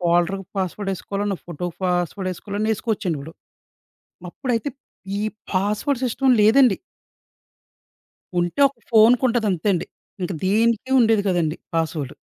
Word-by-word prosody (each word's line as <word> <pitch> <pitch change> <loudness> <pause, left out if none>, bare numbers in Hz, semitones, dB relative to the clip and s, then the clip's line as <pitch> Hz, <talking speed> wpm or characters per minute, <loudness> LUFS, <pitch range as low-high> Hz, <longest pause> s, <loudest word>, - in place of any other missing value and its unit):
ఫోల్డర్‌కి 175 +2 +1
password 195 +2 -2
యేసుకోవాలన్నా 200 +1 -3
ఫోటోకి 175 0 -5
password 180 +1 -1
యెసుకోవాలన్నా 205 +4 -3
యేసుకోవచ్చండి 195 -7 -2
ఇప్పుడు. 155 +4 -9 1.0
అప్పుడైతే 245 +5 -2 0.5
ఈ - - -2 0.3
పాస్‌వర్డ్‌ 210 +8 0
సిస్టమ్ 255 +2 +2
లేదండి. 235 0 +5 1.6
ఉంటే 175 +10 -2
ఒక 275 - -22
ఫోనుకి 230 +3 +6
ఉంటదంతే 215 -5 0
అండి. 175 - -1 0.4
ఇంక 180 +1 -2
దేనికి 225 +5 +2
ఉండేది 225 -3 +4
కాదండీ 170 -3 0 0.2
పాస్‌వర్డు. 155 -4 -2
200 Hz, 110 wpm, -22 LUFS, 175-225 Hz, 1.6 s, ఫోనుకి